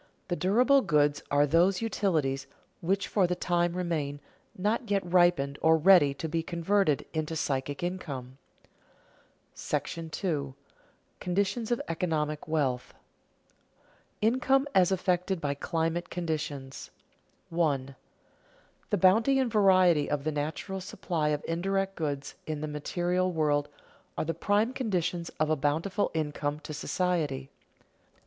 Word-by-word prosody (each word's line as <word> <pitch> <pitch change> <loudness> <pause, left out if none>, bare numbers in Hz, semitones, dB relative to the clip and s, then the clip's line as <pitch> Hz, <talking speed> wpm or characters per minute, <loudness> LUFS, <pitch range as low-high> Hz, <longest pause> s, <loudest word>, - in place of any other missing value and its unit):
The 175 - 0
durable 245 +10 +4
goods 150 - +2
are 145 +1 +4
those 175 +6 +3
utilities 160 -11 0 0.3
which 195 +3 0
for 195 -4 +2
the 180 - -1
time 175 -1 0
remain, 155 -6 -2 0.4
not 215 +5 -1
yet 200 -1 +1
ripened 175 -6 +3
or 160 0 +5
ready 165 -3 +6
to 160 - -4
be 165 +1 -1
converted 170 -1 +1
into 155 0 -2
psychic 140 0 -2
income. 140 -8 -5 1.2
§ - - -2 0.4
II. 145 -7 -1 0.7
CONDITIONS 200 +5 -1
OF 240 - +1
ECONOMIC 155 -3 -2
WEALTH 135 -6 0
[Sidenote: - - -25 1.3
Income 270 +2 +2
as 185 -1 +4
affected 185 0 0
by 145 -2 -1
climatic 165 +4 -2
conditions] 150 -5 -4 0.6
1. 140 -5 0 0.9
_The 205 - +1
bounty 220 +9 +4
and 260 -3 +1
variety 185 -7 +4
of 145 -1 -1
the 155 - -1
natural 155 +6 -4
supply 170 -4 -2
of 150 -1 -1
indirect 195 +3 -1
goods 145 -3 -3
in 155 -1 -3
the 155 - -3
material 175 +5 -1
world 150 -3 +1 0.5
are - - -1
the 165 - -1
prime 210 +7 +1
conditions 180 -9 -2
of 155 0 +1
a - - +4
bountiful 160 +8 0
income 150 -1 -2
to 155 - -7
society. 150 -5 -1
165 Hz, 130 wpm, -29 LUFS, 150-190 Hz, 1.3 s, ready